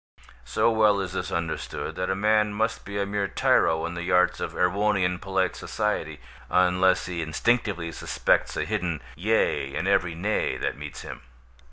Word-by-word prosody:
So 115 - +2
well 105 -2 +4
is 95 -2 -4
this - - -3
understood, 85 -1 -3
that 90 0 -3
a 95 - +1
man 105 +1 +2
must 110 +2 -1
be 100 0 -5
a 100 - 0
mere 100 0 -1
tyro 80 -3 +2
in 85 - -4
the 85 +1 -4
arts 90 0 +3
of - - -4
Erewhonian 90 -1 +1
polite 95 -2 -1
society, - - -2 0.3
unless 90 +1 +3
he 85 -2 -3
instinctively 85 +1 0
suspects - - 0
a - - 0
hidden 85 -4 -2
"yea" 85 -7 0
in - - -2
every 85 -1 +2
"nay" 105 +6 -1
that - - -2
meets 75 -2 -8
him. - - -8
90 Hz, 170 wpm, -26 LUFS, 85-105 Hz, 0.3 s, well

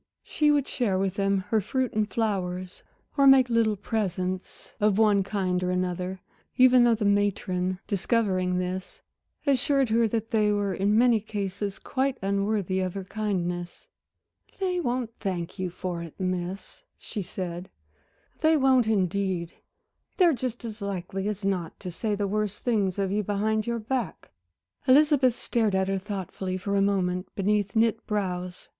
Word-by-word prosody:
She 300 -1 +1
would 290 -2 +2
share 215 -8 0
with 190 -1 0
them 195 0 +1
her 220 -1 +2
fruit 255 +5 -1
and 215 0 0
flowers, 185 -5 -2 0.4
or 275 -1 +6
make 260 -2 +6
little 225 -2 +3
presents 185 -3 -3
of 210 -1 +3
one 210 -2 +4
kind 190 -2 -1
or 180 - -1
another, 180 +1 -2 0.4
even 255 -1 +7
though 235 -1 +5
the 215 -1 -2
matron, 190 -2 +1
discovering 190 -3 0
this 185 +1 -4 0.5
assured 275 -1 +2
her 230 +1 +3
that 225 0 -3
they 215 -2 +3
were 205 -2 0
in 205 +2 +2
many 240 -1 +5
cases 200 -1 -4
quite 270 0 -1
unworthy 200 -1 0
of 185 -1 -2
her 195 - -4
kindness. 180 -4 -3 0.7
"They 365 -2 0
won't 245 -6 -1
thank 180 -2 -4
you 185 -1 -1
for 175 0 -5
it, 165 -2 -10
Miss," 185 +1 -4 0.2
she 210 - -5
said 180 -1 -5 0.7
"they 315 0 +4
won't 260 -4 +4
indeed. 190 -4 0 0.6
They're 350 -4 +5
just 245 -2 -4
as 220 -1 -7
likely 195 0 -3
as 210 -1 -3
not 180 -4 -2
to 180 - -6
say 210 +5 -2
the 200 0 -1
worst 210 0 -2
things 205 -6 +1
of 195 -1 0
you 210 +1 +1
behind 215 +2 0
your 235 0 0
back." 230 -4 -3 0.6
Elizabeth 275 -2 +5
stared 220 -6 0
at 190 0 +1
her 195 0 0
thoughtfully 190 -2 -4
for 200 +2 -2
a 200 - +3
moment 185 -2 0
beneath 205 0 0
knit 225 0 +2
brows. 185 -4 -3
200 Hz, 160 wpm, -27 LUFS, 185-225 Hz, 0.7 s, even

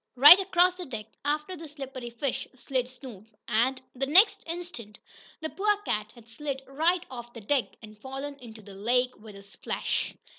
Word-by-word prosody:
Right 295 +9 +11
across 365 -1 +3
the 360 -2 -8
deck, 225 -5 -6 0.2
after 300 +5 -1
the 325 -1 -9
slippery 270 -4 -7
fish 240 +3 -3
slid 255 -1 -2
Snoop, 245 -5 -12 0.2
and, 240 +4 +2
the 270 +1 -2
next 370 +10 +6
instant, 335 - -7 0.4
the 315 - -3
poor 415 +1 +1
cat 210 0 -1
had 235 -2 -17
slid 270 +3 -5
right 335 +6 +1
off 240 -1 -8
the 230 - -9
deck, 260 +4 0
and 215 0 -11
fallen 275 +2 -6
into 225 -3 -12
the 200 0 -12
lake 250 +5 +1
with 210 -1 -12
a 200 - -12
splash! 200 - -3
265 Hz, 180 wpm, -28 LUFS, 230-300 Hz, 0.4 s, Right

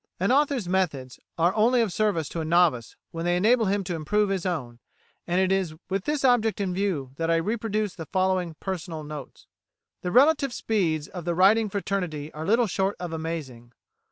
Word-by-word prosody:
An 195 +6 +1
author's 275 -6 +2
methods 155 -9 -1 0.2
are 170 +2 +3
only 230 +4 +3
of 220 -6 +1
service 200 -8 0
to 170 - -5
a - - -2
novice 160 -8 +2 0.2
when 165 0 -5
they 175 +1 +1
enable 225 +5 +3
him 200 +1 0
to 180 -1 -4
improve 195 +6 0
his 190 -2 -1
own; 125 -10 -4 0.5
and 175 +1 +1
it 190 0 +2
is 190 -5 0 0.2
with 195 0 -1
this 295 -2 0
object 225 -4 +3
in 190 -3 -1
view 180 -9 -2
that 165 0 -1
I 165 - +4
reproduce 215 +3 -1
the 165 -4 -8
following 185 -3 0
personal 175 -4 -5
notes. 150 -3 -9 0.6
The 180 - -3
relative 275 - +4
speeds 165 -8 0
of 180 -2 -8
the 170 0 -1
writing 210 +4 +4
fraternity 180 -7 -3
are 155 +1 -6
little 230 +3 +4
short 195 0 -1
of 175 -2 -5
amazing. 150 -8 -6
185 Hz, 190 wpm, -26 LUFS, 165-210 Hz, 0.6 s, I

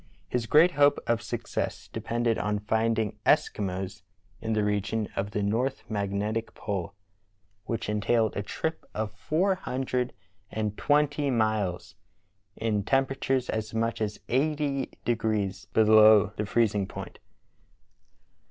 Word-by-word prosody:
His 120 -2 -2
great 160 +7 +6
hope 145 -3 +4
of 115 -1 +1
success 120 +1 -4
depended 115 -1 -1
on 105 0 0
finding 110 +1 0
Eskimos 95 -2 0 0.4
in 110 0 -1
the 105 -1 +1
region 105 +1 0
of 100 - -1
the 105 0 -2
north 120 +6 0
magnetic 105 +2 -2
pole, 100 -2 -4 0.7
which 115 +1 -3
entailed 110 +1 +1
a - - -1
trip 160 +10 -3
of 110 -1 -2
four 175 - +1
hundred 130 -7 -2 0.4
and 105 -1 -2
twenty 145 +1 +2
miles, 110 -7 0 0.6
in 110 -2 -1
temperatures 135 0 +1
as 110 0 -3
much 115 0 -1
as 105 -1 -2
eighty 140 0 0 0.2
degrees 110 -4 -1
below 110 -2 +6
the 105 - -3
freezing 105 -3 +1
point. - - -8
110 Hz, 125 wpm, -28 LUFS, 105-125 Hz, 0.7 s, great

